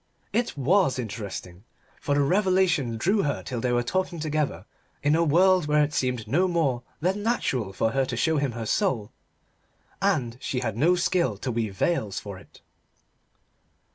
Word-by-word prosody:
It 235 -9 -1
was 145 -1 +3
interesting, 100 -5 -6 0.4
for 145 - 0
the 145 - +3
revelation 180 - +2
drew 195 - +2
her 145 - -2
till 125 -3 -4
they 125 - 0
were 120 0 +2
talking 175 +5 -2
together 150 - -2 0.4
in 145 +2 +3
a 165 - +3
world 180 +2 +4
where 150 0 +4
it 145 +1 -2
seemed 125 -5 -1
no 175 +11 +2
more 155 -9 0 0.2
than 190 +5 0
natural 135 - -1
for 110 +3 0
her 135 +2 +1
to - - -4
show 160 -1 +2
him 140 -4 0
her 115 -1 -5
soul: 120 - 0 0.9
and 130 -12 0
she 125 - -2
had 110 -5 -2
no 165 +9 +3
skill 175 - +1
to 125 - -3
weave 110 -4 -3
veils 110 - 0
for 100 -2 -8
it. - - -19
140 Hz, 170 wpm, -26 LUFS, 115-175 Hz, 0.9 s, world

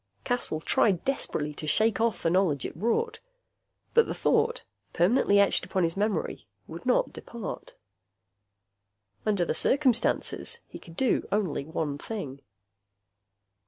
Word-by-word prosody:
Caswell 245 -11 -2
tried 185 +1 +2
desperately 150 - -2
to 155 - -7
shake 220 +7 +2
off 230 -1 0
the 165 - +2
knowledge 175 -7 +2
it - - -5
brought. 445 - 0 0.7
But 465 -1 +5
the - - -3
thought, 475 - +1 0.3
permanently 200 +2 +4
etched 200 - +4
upon 185 - -1
his 165 0 0
memory, 200 - -2 0.2
would 170 +9 -9
not 250 - +2
depart. 235 -4 -7 1.5
Under 200 -5 +2
the - - 0
circumstances, 260 -4 +1
he - - -10
could 165 -1 -14
do 260 -3 +1
only 185 -9 0
one 150 -2 -3
thing. 145 -12 -6
200 Hz, 130 wpm, -28 LUFS, 160-235 Hz, 1.5 s, But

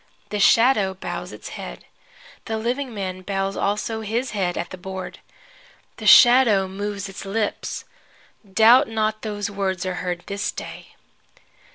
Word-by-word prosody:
The 210 - -3
shadow 210 -2 +4
bows 180 -1 -6
its 105 - -9
head. - - -8 0.6
The 220 - -2
living 250 +4 -2
man 190 -3 -5
bows 195 0 -2
also 215 +2 -1
his 230 +4 -2
head 190 -4 -1
at 175 - -4
the 185 - -7
board. 190 0 -7 0.8
The - - -4
shadow 240 -6 +7
moves 200 +1 -4
its 195 +1 -9
lips. 205 +2 -3 0.7
Doubt 235 +7 +6
not 215 -1 -1
those 205 -1 -4
words 190 -3 -2
are 185 - -2
heard 175 -1 -3
this 200 0 -3
day. - - -9
205 Hz, 145 wpm, -22 LUFS, 190-220 Hz, 0.8 s, shadow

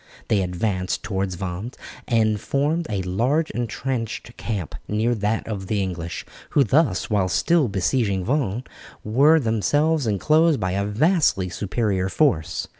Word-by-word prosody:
They 105 -3 +3
advanced 90 +1 -2
towards 95 -3 -2
Vannes 95 +6 -5 0.3
and 110 -3 +2
formed 150 +6 0
a 100 -3 -1
large 125 - 0
entrenched 120 -1 -4
camp 100 -9 -4
near 110 +3 +1
that 110 0 -1
of 100 -4 -4
the 105 0 0
English, 85 -3 -4 0.2
who 140 - +4
thus, 130 - +1
while 95 -3 +2
still 150 - +2
besieging 100 -1 0
Vannes, 125 -4 0 0.4
were 140 +9 +4
themselves 145 +5 +1
enclosed 155 - +3
by 95 -1 -1
a 100 +2 0
vastly 115 - +2
superior 95 0 -1
force. 90 - +1
110 Hz, 135 wpm, -23 LUFS, 95-135 Hz, 0.4 s, who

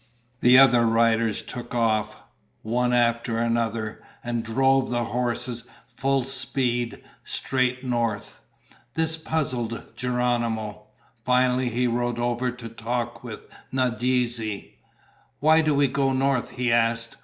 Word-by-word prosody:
The 125 +1 +6
other 125 -3 +7
riders 115 -1 +2
took 120 0 -7
off, 110 -3 0 0.4
one 125 +3 0
after 120 -1 +1
another, 115 -2 -1 0.2
and 120 -1 -2
drove 135 +3 +2
the 120 -1 0
horses 120 0 -2 0.2
full 135 0 0
speed 125 -3 -1 0.2
straight 130 -1 -1
north. 120 -4 -2 0.5
This 160 0 +1
puzzled 130 -8 -3
Geronimo. 120 -4 -1 0.4
Finally 125 0 +2
he 120 +2 0
rode 120 0 0
over 120 +1 0
to 125 -1 -8
talk 120 +1 -4
with 115 -4 -7 0.3
Nadeze. 120 -3 -1 0.7
"Why 160 +2 +5
do 155 -2 +1
we 140 0 +4
go 135 0 0
north?" 130 -1 +1
he 125 -1 -1
asked. 115 0 +1
120 Hz, 120 wpm, -25 LUFS, 115-130 Hz, 0.7 s, other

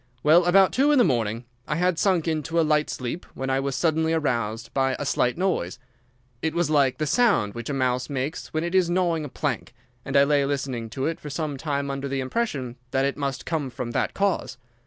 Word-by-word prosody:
Well, 165 +4 +6
about 190 +1 +5
two 280 +3 +3
in 295 - +4
the 245 - +6
morning 115 - 0 0.2
I 150 - -1
had 180 0 +1
sunk 180 -5 +2
into 160 +1 0
a 165 - +4
light 150 0 +2
sleep 125 +7 -4
when 135 0 -2
I 135 - +2
was 135 -1 -2
suddenly 160 -1 +1
aroused 115 -7 -1
by 135 -1 +1
a 145 - -4
slight 125 -1 +1
noise. 175 - -1 0.6
It 160 0 -1
was 170 -3 +1
like 140 -4 +3
the 155 - -1
sound 175 - +2
which 120 +2 -6
a - - -1
mouse 125 0 0
makes 140 +3 -3
when 155 +1 -1
it 175 +1 -3
is 185 -2 +3
gnawing 175 -3 +1
a - - -6
plank, - - -3 0.3
and 135 +1 0
I 140 - +7
lay 140 0 +3
listening 135 -5 -2
to 130 +5 -3
it 165 0 -2
for 150 - -8
some 150 0 -3
time 140 0 -2
under 135 0 -3
the 135 0 -2
impression 130 - -2
that 135 +2 +1
it 140 - -1
must 140 -2 -3
come 155 -5 -2
from 120 -1 -5
that - - -1
cause. 195 -9 0
145 Hz, 225 wpm, -25 LUFS, 130-165 Hz, 0.6 s, I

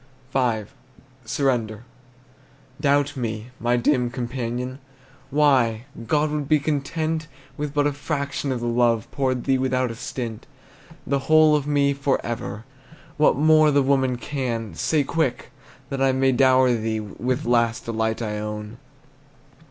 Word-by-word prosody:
V. 120 -5 +1 0.6
SURRENDER. 115 -3 -1 1.0
Doubt 145 0 +2
me, 115 -2 -4
my 120 +1 +1
dim 125 0 +2
companion! 125 +1 -4 0.5
Why, 130 -6 +2 0.2
God 150 +3 +1
would 150 -2 -3
be 155 - +5
content 155 +2 -2 0.3
With 150 -1 -4
but 145 0 +3
a 145 - +1
fraction 140 -1 -3
of 125 -2 -2
the - - -3
love 120 -2 +2
Poured 130 -3 -1
thee 135 -1 +2
without 130 -1 0
a - - -7
stint. 115 -2 -6 0.6
The 140 +1 0
whole 155 -1 +6
of 145 -1 -1
me, 140 -1 +2
forever, 120 -6 -2 0.5
What 150 - +4
more 155 +2 +5
the 145 -1 +3
woman 130 -2 +2
can, 120 - -3
Say 150 - +1
quick, 150 -2 -1 0.4
that 135 -1 -2
I 135 -1 +3
may 130 0 +3
dower 130 0 +4
thee 110 -1 -1
With 125 +6 -3
last 115 0 +1
delight 110 0 -1
I 105 -1 -3
own! 105 +1 -6
130 Hz, 140 wpm, -23 LUFS, 115-145 Hz, 1.0 s, whole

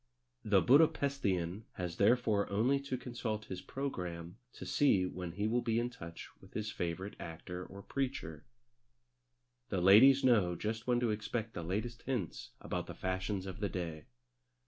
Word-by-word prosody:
The 100 -3 +4
Buda 145 +6 +7
Pesthian 100 - -1
has 90 -2 -4
therefore 105 -1 +3
only 120 +8 +2
to 140 -2 -3
consult 120 -4 -4
his 90 -1 -6
programme 90 -10 -5 0.2
to - - -8
see 100 -10 +3
when 90 -2 -5
he 105 +4 -2
will 120 +2 +1
be 115 -1 0
in 120 +1 0
touch 85 -9 -9
with - - -17
his 110 0 -2
favourite 90 +4 -4
actor 90 +2 -6
or 100 +2 -10
preacher. 125 - -3 1.3
The 95 - 0
ladies 115 +10 +7
know 105 -9 +4
just 110 +6 -3
when 120 -1 +3
to 120 -3 +2
expect 110 +1 -3
the 85 - -4
latest 110 +8 -3
hints 120 - -3
about - - -4
the - - -7
fashions 95 +1 -2
of 95 -1 -6
the 100 - -1
day. 85 -4 -4
105 Hz, 165 wpm, -34 LUFS, 90-120 Hz, 1.3 s, Buda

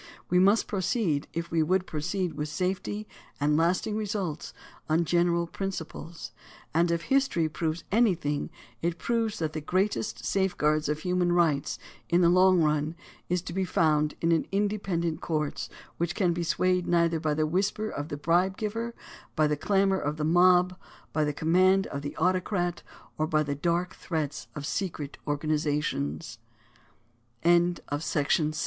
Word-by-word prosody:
We 180 - +5
must 200 +4 +4
proceed, 185 -6 0
if 170 0 -4
we 165 -1 +2
would 180 +4 +2
proceed 175 +3 -2
with 150 0 -4
safety 190 +5 -2 0.3
and 150 +1 +2
lasting 175 +6 +1
results, 200 -7 -3 0.4
on 165 +2 +2
general 170 0 +2
principles; 170 -7 -6 0.4
and 170 +2 +3
if 170 0 0
history 270 - +2
proves 160 +1 -3
anjrthing 180 -11 +1 0.3
it 170 0 -1
proves 225 +1 -1
that 160 -2 -2
the 155 - -3
greatest 125 - -1
safeguard 155 -6 +1
of 150 +1 -1
human 180 0 +1
rights 160 -5 +2 0.3
in 175 +1 +4
the 170 - +5
long 185 -1 +5
run 150 +1 0 0.3
is 180 0 0
to 170 - -6
be 190 +1 0
found 155 -4 +2
in 165 - +2 0.2
independent 195 -5 -1
courts 150 -3 -2 0.3
which 170 +2 -1
can 180 -4 +2
be 175 - -3
swayed 180 +1 +1
neither 170 -1 +2
by 155 -1 0
the 155 0 +1
whisper 195 +6 0
of 145 -7 -5
the 145 - -4
bribe 175 +5 +2
giver, 230 +2 -3 0.4
by 155 - +3
the 150 0 +1
clamor 195 +4 +2
of 150 +2 -2
the 150 - -2
mob, 180 +2 +4 0.4
by 155 - +2
the 150 - +1
command 185 +6 +3
of 140 - -5
the 145 - -6
autocrat, 180 0 0 0.4
or 155 0 0
170 Hz, 135 wpm, -28 LUFS, 155-190 Hz, 0.4 s, We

